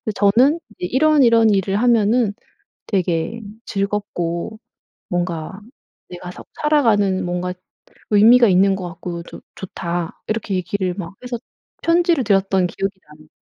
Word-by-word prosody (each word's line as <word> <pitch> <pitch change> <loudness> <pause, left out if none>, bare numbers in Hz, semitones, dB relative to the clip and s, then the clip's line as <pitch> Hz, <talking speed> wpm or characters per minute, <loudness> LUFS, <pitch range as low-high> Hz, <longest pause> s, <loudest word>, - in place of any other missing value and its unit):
저는 245 +10 +3
이제 - - -20
이런이런 250 -4 +4
일을 195 -1 +1
하면은 230 -1 +2 0.5
되게 180 +2 -1 0.2
즐겁고 200 -1 -3 0.5
뭔가 175 +1 -3 0.5
내가 180 0 -8
사 - - -11 0.2
살아가는 215 -12 +2
뭔가 180 +1 -2 0.6
의미가 230 +3 +6
있는 195 +1 +4
것 185 -2 -5
같고 170 0 -7
좋 - - -12
좋다." 175 -2 -5
이렇게 215 -2 -2
얘기를 185 0 -2
막 180 -2 -7
해서 245 -1 -4 0.4
편지를 335 -5 +2
드렸던 195 -2 +2
기억이 195 +2 -4
나요. 150 +1 -18
195 Hz, 270 characters per minute, -20 LUFS, 180-230 Hz, 0.6 s, 의미가